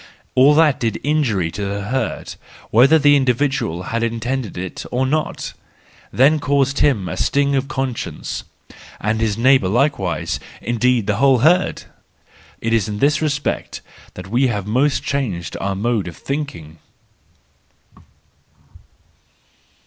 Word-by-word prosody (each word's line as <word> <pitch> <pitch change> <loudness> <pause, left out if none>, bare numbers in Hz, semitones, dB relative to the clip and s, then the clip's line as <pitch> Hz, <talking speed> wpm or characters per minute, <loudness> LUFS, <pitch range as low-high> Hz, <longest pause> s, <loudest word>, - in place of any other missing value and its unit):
All 140 +3 +5
that 155 -3 +4
did 115 -3 -1
injury 120 - 0
to 100 - -5
the 100 +1 -3
herd, 130 +6 -3 0.4
whether 135 +8 +6
the 145 -1 +5
individual 130 - 0
had 115 +5 -3
intended 115 0 -3
it 90 0 -5
or 130 +2 0
not, 155 +3 -2 0.6
then 145 +5 +4
caused 140 -1 +1
him 115 -11 +2
a 80 - -4
sting 140 0 +1
of 135 0 0
conscience—and 120 -4 -5
his 110 -2 0
neighbour 130 -3 +4
like¬ 130 +9 +1
wise, 90 -3 -2 0.2
indeed 120 -1 +1
the 105 -1 0
whole 135 -1 +4
herd 180 +3 +3 0.8
!—It 115 0 0
is 110 -2 +2
in 105 - -4
this 145 +7 +2
respect 150 -1 -2 0.3
that 90 - -8
we 125 +6 +2
have 105 -5 -2
most 130 +7 +1
changed 100 - -3
our 95 0 -1
mode 110 -1 -1
of 85 - -8
thinking. 85 - -5
125 Hz, 135 wpm, -19 LUFS, 105-140 Hz, 0.8 s, whether